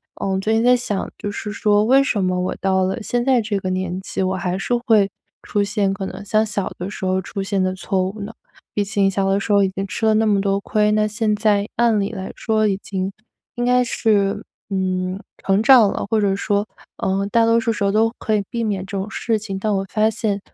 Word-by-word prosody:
呃， - - -4
我 190 - 0
最 215 +3 0
近 225 +1 +2
在 250 +1 +6
想， 210 -5 -3
就 205 - -4
是 210 +1 -5
说 210 -1 +2
为 270 +3 +5
什 210 -7 0
么 185 0 0
我 180 - -2
到 190 -1 +1
了 190 +5 -2
现 240 +2 -1
在 260 -3 +4
这 210 -1 -2
个 185 -1 -3
年 185 0 -2
纪， 190 - -4
我 190 0 0
还 180 0 -2
是 240 +5 -1
会 210 -5 +4 0.3
出 205 -1 0
现 200 -1 0
可 195 0 -4
能 190 +1 -7
像 215 +2 +2
小 205 -2 -3
的 180 +3 -5
时 200 - -8
候 185 0 +1
出 195 - -5
现 195 -1 0
的 185 - 0
错 185 0 -1
误 205 +3 -7
呢？ 205 +2 -5 0.4
毕 205 - +2
竟 200 -1 +1
小 195 0 0
的 195 +1 +2
时 205 - -3
候 200 -1 +5
已 190 - +2
经 195 +1 -3
吃 220 - -3
了 220 - +4
那 220 0 +2
么 205 -2 +3
多 195 0 +1
亏， 210 +1 +1
那 215 0 +2
现 215 0 0
在， 205 -1 +2
按 230 -2 +3
理 200 +1 -1
来 190 -3 -6
说 215 -2 +1
已 195 - 0
经 190 -1 -4 0.4
应 240 0 -1
该 250 0 +4
是， 210 -4 +1 0.3
嗯， 185 -1 -1 0.2
成 195 +1 +1
长 240 -5 +7
了， - - -3
或 220 -2 +2
者 195 -1 +2
说， 205 +1 0 0.3
呃， 195 +1 0
大 230 -1 +4
多 230 0 +4
数 230 0 0
时 210 - -3
候 200 - +2
都 220 +2 +3
可 215 - 0
以 205 - 0
避 235 -1 -2
免 200 -4 -2
这 200 0 -7
种 195 +2 -3
事 225 0 -1
情。 200 -2 -5
但 215 0 0
我 195 0 -1
发 215 0 +3
现， 210 -2 -2
205 Hz, 270 characters per minute, -20 LUFS, 195-220 Hz, 0.4 s, 长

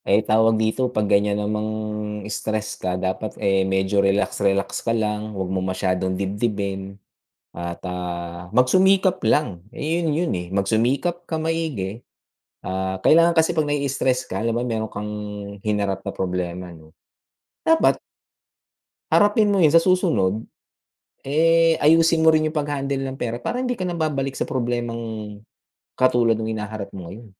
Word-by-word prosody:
Ay 105 +2 +3
tawag 110 +1 +4
dito 110 +4 +1
pag 105 -4 0
ganyan 100 0 +2
namang 105 +1 -1 0.6
stress 110 0 -3
ka 90 0 -1
dapat 95 +3 -3
eh 95 -1 +2
medyo 95 +1 +2
relax-relax 100 0 +1
ka 115 0 0
lang 105 -1 -2
wag 95 - -1
mo 95 - 0
masyadong 95 0 -1
dibdibin 100 -1 -3 0.6
at, 85 0 -5
ah, 90 -1 -5
magsumikap 185 - +3
lang 100 - +1
eh 160 +6 -2
yun, 165 - +1
yun 175 -1 0
eh 90 -1 -4
magsumikap 120 - 0
ka 165 -2 -4
maigi, 155 -11 -2 0.6
ah, 95 0 -3
kailangan 170 +2 +5
kasi 160 0 +4
pag 155 -3 0
nai-istress 140 -3 0
ka 95 - -2
halimbawa 115 +2 0
meron 110 -3 -2
kang 105 0 -6 0.5
hinarap 100 -2 -1
na - - -4
problema 90 -1 -3
no 80 -1 -16 0.7
dapat 325 0 +4 1.2
harapin 205 0 +4
mo 200 - +2
yun 160 -2 +5
sa 165 - +7
susunod 160 - +2 0.9
eh 165 +3 +4
ayusin 165 +1 +5
mo 160 - +7
rin 155 0 +3
yung 155 - -11
paghandle 140 -2 -1
ng 135 0 -6
pera 120 -1 -2
para 245 - -3
hindi 250 -1 -1
ka 185 - -3
na 180 - -2
babalik 140 -4 -1
sa - - -3
problemang 115 -4 -3 0.6
katulad 120 -3 +3
nung 110 - -3
hinaharap 105 -1 -5
mo 90 -3 -8
ngayon, 115 +4 -10
110 Hz, 150 wpm, -22 LUFS, 95-150 Hz, 1.2 s, sa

